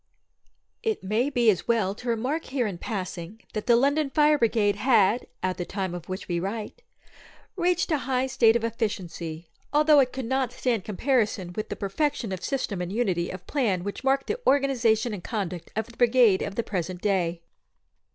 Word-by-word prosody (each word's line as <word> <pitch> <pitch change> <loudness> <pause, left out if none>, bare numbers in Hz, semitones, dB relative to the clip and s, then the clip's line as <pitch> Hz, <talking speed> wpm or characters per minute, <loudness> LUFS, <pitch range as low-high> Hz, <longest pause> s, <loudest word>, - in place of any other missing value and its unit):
It 440 -2 -1
may 220 +8 +1
be 240 -5 +4
as 185 - -4
well 215 -5 +2
to 245 +4 -6
remark 255 +8 -1
here 260 -2 -1
in 190 -5 -4
passing, 190 0 -5
that 215 - -4
the 240 - +6
London 280 +4 +2
Fire 300 +1 +4
Brigade 215 -3 +2
had, 225 -1 +3 0.2
at 185 -1 -1
the 175 - -2
time 190 -1 -3
of 175 0 -8
which 185 +1 -5
we 175 -1 -1
write, 210 - -5 0.7
reached 355 -2 +1
a 305 - +2
high 260 -1 0
state 235 -4 +4
of 235 - +1
efficiency, 175 -7 -4 0.2
although 300 0 +5
it 255 -2 +3
could 265 -2 -5
not 265 0 0
stand 245 -4 -1
comparison 210 -4 0
with 215 - -4
the - - -3
perfection 235 +2 -1
of 190 -1 -5
system 235 -9 -2
and 180 0 -4
unity 190 -6 0
of 185 -1 -8
plan 215 -11 0
which 200 +6 -5
mark 270 +1 +2
the 475 - -2
organisation 245 -5 +2
and 190 -4 -6
conduct 185 -6 -4
of 220 0 -1
the 235 0 -16
Brigade 240 -5 +5
of 200 - -4
the 235 - 0
present 180 -3 -3
day. 175 -4 0
225 Hz, 190 wpm, -26 LUFS, 190-260 Hz, 0.7 s, the